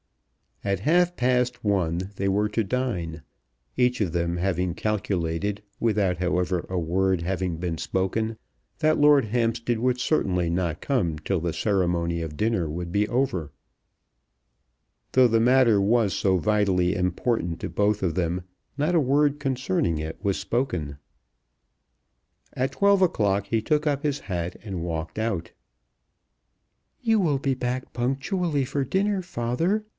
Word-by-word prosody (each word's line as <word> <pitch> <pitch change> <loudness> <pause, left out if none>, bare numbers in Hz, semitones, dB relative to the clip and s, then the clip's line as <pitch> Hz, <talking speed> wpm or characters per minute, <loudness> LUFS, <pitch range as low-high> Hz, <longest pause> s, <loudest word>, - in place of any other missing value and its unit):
At 100 -2 -1
half 175 - +3
past 125 0 +1
one 95 -2 0
they 100 - 0
were 105 +2 +1
to 115 +2 0
dine, 95 - -2 0.5
each 125 -1 +2
of 90 -6 0
them 85 0 0
having 90 -1 0
calculated, 100 -1 -2 0.2
without, 105 -5 +1
however, 90 0 0
a 95 - -2
word 90 +2 +1
having 90 -1 -2
been 85 -1 -3
spoken, 110 +4 -1 0.4
that 155 -1 +2
Lord 145 -3 +6
Hampstead 115 +1 0
would 125 +1 +1
certainly 90 - +1
not 85 -2 -1
come 90 - 0
till 95 +2 -1
the 85 0 -2
ceremony 85 -4 0
of 75 -2 -6
dinner 105 -7 0
would 85 +2 -5
be 105 +2 +1
over. 105 - -1 1.6
Though 130 -1 +6
the 115 -1 +2
matter 120 -2 +5
was 105 0 +2
so 95 -2 +2
vitally 95 -2 +2
important 90 -1 -1
to - - -3
both 105 0 +1
of 85 -3 +1
them, 90 +1 -1 0.3
not 150 +4 +1
a 170 - +5
word 145 +1 +2
concerning 125 - 0
it 80 +1 -5
was 100 -2 +1
spoken. 95 - -2 1.6
At 130 +2 -1
twelve 200 +6 +4
o'clock 100 - +2
he 110 +1 0
took 150 +3 +1
up 145 0 0
his 145 -2 0
hat, 90 -1 -4
and 95 -6 -4
walked 80 0 -4
out. 110 -7 -2 1.5
"You 225 -2 +3
will 150 -8 +1
be 135 0 0
back 125 0 -3
punctually 135 +5 -1
for 140 +2 -1
dinner, 195 +7 0
father?" 170 - -1
105 Hz, 145 wpm, -25 LUFS, 90-130 Hz, 1.6 s, Lord